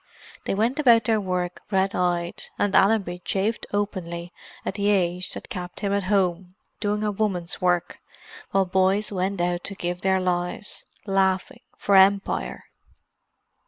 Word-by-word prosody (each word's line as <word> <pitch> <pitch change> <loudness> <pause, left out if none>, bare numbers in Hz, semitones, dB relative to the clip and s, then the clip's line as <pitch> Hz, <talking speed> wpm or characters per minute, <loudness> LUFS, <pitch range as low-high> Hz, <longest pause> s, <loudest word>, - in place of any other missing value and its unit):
They - - 0
went 230 +8 +1
about 235 -6 +6
their 220 -1 +1
work 180 -2 -2
red 195 -1 +1
eyed, 175 -1 -1
and 205 -1 +1
Allenby 195 -4 +3
chafed 205 +4 -1
openly 175 -4 -3 0.3
at - - -2
the 200 +1 0
age 180 -2 +1
that - - -8
kept 180 -6 -6
him 200 -1 0
at 200 -2 0
home, 185 -2 0 0.2
doing 210 0 -1
a 210 - +1
woman's 195 -5 -2
work, 175 -1 0 0.5
while 195 -1 +2
boys 190 +3 +2
went 190 0 -1
out 175 0 0
to 200 - -4
give 175 0 -3
their 190 0 +2
lives, 180 +2 -2 0.2
laughing, 190 -2 +1 0.2
for 200 - +2
Empire. 195 +1 +3
190 Hz, 150 wpm, -24 LUFS, 180-205 Hz, 0.5 s, about